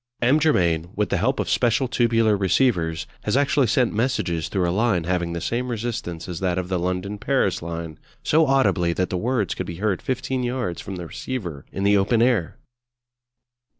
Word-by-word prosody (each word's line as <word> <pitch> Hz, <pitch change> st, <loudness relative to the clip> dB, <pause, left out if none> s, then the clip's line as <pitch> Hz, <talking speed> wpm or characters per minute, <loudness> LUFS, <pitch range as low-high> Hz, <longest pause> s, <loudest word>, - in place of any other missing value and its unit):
M. 135 Hz, +6 st, +4 dB
Germain, 85 Hz, -, +2 dB
with 105 Hz, 0 st, 0 dB
the -, -, +1 dB
help 130 Hz, +9 st, 0 dB
of -, -, -1 dB
special 125 Hz, +2 st, +2 dB
tubular 115 Hz, -3 st, +2 dB
receivers, 95 Hz, -5 st, +1 dB, 0.2 s
has -, -, 0 dB
actually 140 Hz, -2 st, +3 dB
sent 125 Hz, +2 st, +2 dB
messages 105 Hz, -, -1 dB
through 95 Hz, -3 st, 0 dB
a -, -, +1 dB
line 105 Hz, -4 st, +1 dB
having 85 Hz, 0 st, -1 dB
the 85 Hz, -, -3 dB
same 125 Hz, +2 st, -2 dB
resistance 115 Hz, -8 st, -4 dB
as 90 Hz, -2 st, -5 dB
that 90 Hz, -2 st, 0 dB
of 90 Hz, -1 st, -3 dB
the 95 Hz, -2 st, 0 dB
London 90 Hz, +3 st, -2 dB
Paris 125 Hz, -4 st, +1 dB
line, 85 Hz, -2 st, -6 dB, 0.2 s
so 160 Hz, 0 st, +3 dB
audibly 105 Hz, -11 st, +2 dB
that 90 Hz, +1 st, -1 dB
the -, -, -1 dB
words 115 Hz, 0 st, 0 dB
could 95 Hz, -, -5 dB
be 85 Hz, -, -5 dB
heard 100 Hz, +1 st, -1 dB
fifteen 130 Hz, 0 st, -2 dB
yards 125 Hz, -8 st, -2 dB
from 95 Hz, -, -6 dB
the 90 Hz, -1 st, -6 dB
receiver 85 Hz, -, -6 dB
in 95 Hz, -, -4 dB
the 100 Hz, 0 st, +4 dB
open 105 Hz, +4 st, +2 dB
air! 115 Hz, -9 st, +1 dB
100 Hz, 190 wpm, -23 LUFS, 90-125 Hz, 0.2 s, M